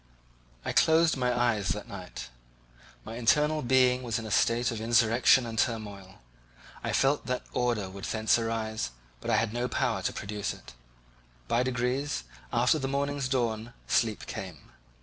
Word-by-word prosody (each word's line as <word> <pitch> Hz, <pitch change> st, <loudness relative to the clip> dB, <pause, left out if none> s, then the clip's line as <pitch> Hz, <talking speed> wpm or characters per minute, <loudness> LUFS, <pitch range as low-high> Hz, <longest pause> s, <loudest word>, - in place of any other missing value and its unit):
I -, -, -1 dB
closed 160 Hz, 0 st, +4 dB
not 130 Hz, -, -6 dB
my -, -, -1 dB
eyes 110 Hz, -5 st, +1 dB
that -, -, -3 dB
night. -, -, -8 dB, 0.8 s
My 115 Hz, -, -7 dB
internal 150 Hz, +6 st, +3 dB
being 125 Hz, 0 st, +3 dB
was 120 Hz, -2 st, -2 dB
in 115 Hz, -, -5 dB
a 110 Hz, -, -6 dB
state 120 Hz, +3 st, +2 dB
of 110 Hz, -2 st, -4 dB
insurrection 115 Hz, +2 st, +4 dB
and 115 Hz, -1 st, -4 dB
turmoil; 100 Hz, -5 st, -2 dB, 0.7 s
I -, -, -1 dB
felt 140 Hz, +2 st, +2 dB
that 125 Hz, -1 st, -2 dB
order 120 Hz, -5 st, 0 dB
would 95 Hz, +1 st, -8 dB
thence 110 Hz, +1 st, +2 dB
arise, 110 Hz, -, -2 dB, 0.3 s
but -, -, -6 dB
I 115 Hz, -, +4 dB
had 110 Hz, 0 st, 0 dB
no 120 Hz, +1 st, -1 dB
power 115 Hz, -, 0 dB
to -, -, -1 dB
produce 105 Hz, 0 st, -4 dB
it. -, -, -14 dB, 0.7 s
By 120 Hz, -, +2 dB
degrees, 125 Hz, -, -1 dB, 0.3 s
after 125 Hz, +6 st, +3 dB
the 135 Hz, -, -2 dB
morning's 140 Hz, -1 st, -1 dB
dawn, 120 Hz, -3 st, -1 dB
sleep 110 Hz, -3 st, +1 dB
came. 90 Hz, -7 st, -8 dB
120 Hz, 165 wpm, -29 LUFS, 110-130 Hz, 0.8 s, closed